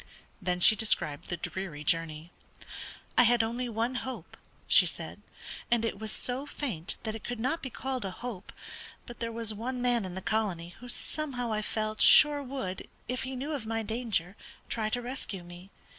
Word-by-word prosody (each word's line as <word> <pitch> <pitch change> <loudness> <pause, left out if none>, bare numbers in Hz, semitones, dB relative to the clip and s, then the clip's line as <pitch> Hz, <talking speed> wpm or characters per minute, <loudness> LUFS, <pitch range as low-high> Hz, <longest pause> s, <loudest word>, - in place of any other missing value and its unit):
Then 180 -1 +1
she 200 +5 +8
described 155 -10 +1
the 175 - -1
dreary 170 -7 -4
journey. 165 +1 0 0.8
"I - - +8
had 240 -1 +5
only 240 +2 -2
one 230 +3 0
hope," 245 -10 -6 0.3
she - - +7
said, - - -7 0.5
"and 235 -1 +3
it 210 -3 -2
was 220 0 -3
so 255 +5 -1
faint 205 - -2
that 220 - -2
it 225 - -7
could 245 -1 -4
not 265 +8 0
be 265 - -4
called 260 0 -3
a 195 - -2
hope; 210 0 -6 0.5
but 240 - -9
there 230 -1 -1
was 225 -1 -1
one 245 +4 -3
man 245 -2 +2
in 185 -1 -5
the 190 - -4
colony 190 -6 0
who 245 - -9
somehow 245 -4 -2
I 215 - 0
felt 215 0 -2
sure 295 -1 +8
would, 255 -9 -4 0.2
if 250 +1 -1
he 265 0 -3
knew 275 +5 -3
of 250 -7 -4
my 225 0 -1
danger, 220 -5 0 0.3
try 220 -2 0
to 245 +2 -1
rescue 235 -7 -4
me. 175 +2 -11
225 Hz, 190 wpm, -30 LUFS, 190-250 Hz, 0.8 s, she